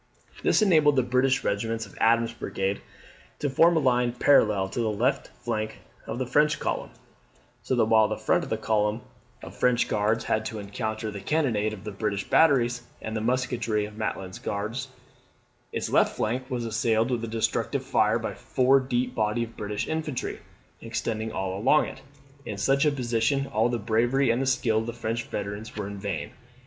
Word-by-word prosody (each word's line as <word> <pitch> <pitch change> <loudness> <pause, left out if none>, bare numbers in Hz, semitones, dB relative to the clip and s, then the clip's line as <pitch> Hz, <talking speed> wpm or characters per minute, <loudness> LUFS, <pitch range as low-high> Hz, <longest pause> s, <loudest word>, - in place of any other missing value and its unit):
This - - +3
enabled 155 -7 +5
the 130 - +3
British 130 +2 +2
regiments 115 +2 -1
of 100 - -16
Adams's 115 +1 +3
brigade 95 -2 -2 0.6
to 145 - -2
form 165 +5 +5
a - - +5
line 125 -3 +2
parallel 105 -7 +4
to 120 - -4
the 115 -2 +1
left 125 +6 0
flank 110 -2 -3 0.3
of 110 - -4
the 130 - -1
French 150 +4 +2
column; - - -2 0.7
so 130 - -1
that 115 - +3
while 110 -1 +5
the - - -3
front - - +1
of - - -7
this - - -1
column 105 +1 +1 0.4
of - - -9
French 125 -1 +2
Guards 105 +2 +1
had 110 - 0
to 110 - -4
encounter 110 +1 -4
the 100 -1 -7
cannonade 115 -5 +1
of 105 -2 -8
the 105 - -5
British 100 -1 -2
batteries, 125 -6 +4 0.2
and 110 - -5
the 110 - -1
musketry 120 -3 0
of 105 0 -10
Maitlands 95 -4 -4
Guards, 110 +6 -3 0.8
its - - -2
left - - +3
flank 125 +4 -2
was 125 -3 -2
assailed 115 +1 +1
with 120 -2 -1
a - - -2
destructive 115 0 -1
fire - - +2
by - - -3
a - - -10
four 130 - +3
deep 125 -1 -1
body 110 0 0
of 115 0 -9
British 105 0 -3
infantry, 155 -4 -3 0.4
extending 110 -1 -3
all 95 -2 -3
along 135 +8 +4
it. - - -9 0.4
In 105 - -5
such 135 +8 +2
a - - +4
position 125 0 0
all 115 -2 +1
the 120 - 0
bravery 115 +4 +2
and 130 +3 +1
skill 125 -4 +2
of 110 - -4
the 120 - -3
French 115 0 -3
veterans 105 +2 -5
were 105 -2 -4
vain. 100 0 -4
115 Hz, 185 wpm, -26 LUFS, 110-130 Hz, 0.8 s, enabled